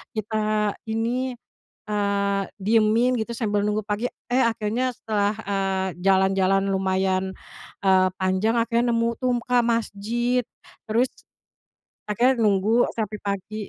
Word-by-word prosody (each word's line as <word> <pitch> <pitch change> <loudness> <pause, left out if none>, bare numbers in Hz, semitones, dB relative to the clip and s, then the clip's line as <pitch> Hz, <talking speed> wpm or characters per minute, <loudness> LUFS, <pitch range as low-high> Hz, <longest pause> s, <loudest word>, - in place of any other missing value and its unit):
kita 215 -1 0
ini, 245 +3 -1 0.5
eee, 200 -1 0 0.2
diemin 225 +4 +3
gitu 220 - -7
sambil 210 -3 0
nunggu 210 +1 0
pagi." 220 +4 -1 0.2
Eh, 260 - +4
akhirnya 230 +3 -1
setelah. 210 -1 0
eee, 195 -1 0
jalan-jalan 195 0 +3
lumayan, 190 0 0 0.5
eee, 185 -1 +5
panjang 190 +4 +1
akhirnya 235 +1 +1
nemu 230 0 +1
tuh 250 -1 +1
Kak, 245 -1 +3
masjid, 235 +2 0 0.5
terus 235 +4 +2 1.0
akhirnya 245 +5 +3
nunggu 215 +3 +3
sampai 215 -2 -3
pagi. 200 +1 -4
215 Hz, 115 wpm, -24 LUFS, 195-230 Hz, 1.0 s, eee